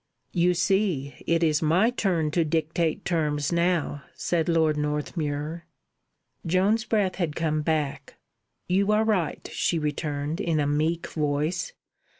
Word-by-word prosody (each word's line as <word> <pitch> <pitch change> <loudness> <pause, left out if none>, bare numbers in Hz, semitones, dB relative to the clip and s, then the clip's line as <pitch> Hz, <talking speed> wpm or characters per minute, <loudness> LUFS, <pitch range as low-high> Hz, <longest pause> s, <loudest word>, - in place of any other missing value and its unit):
"You 180 0 +3
see, 170 -7 0
it 170 0 +2
is 155 -2 +2
my 175 +9 +3
turn 175 -10 0
to 170 +2 +2
dictate 160 +3 -1
terms 150 -4 0
now," 170 -4 +1
said 170 -1 0
Lord 160 -2 +3
Northmuir. 150 +1 -3 0.8
Joan's 195 +7 +2
breath 210 -4 0
had 165 -5 -1
come 155 -2 0
back. 150 -3 -2 0.5
"You 195 +3 +2
are 215 +1 +3
right," 200 -8 0
she 170 - +1
returned, 150 0 -2
in 165 -3 0
a 145 - +1
meek 155 +4 0
voice. 150 - -1
165 Hz, 135 wpm, -26 LUFS, 150-180 Hz, 0.8 s, You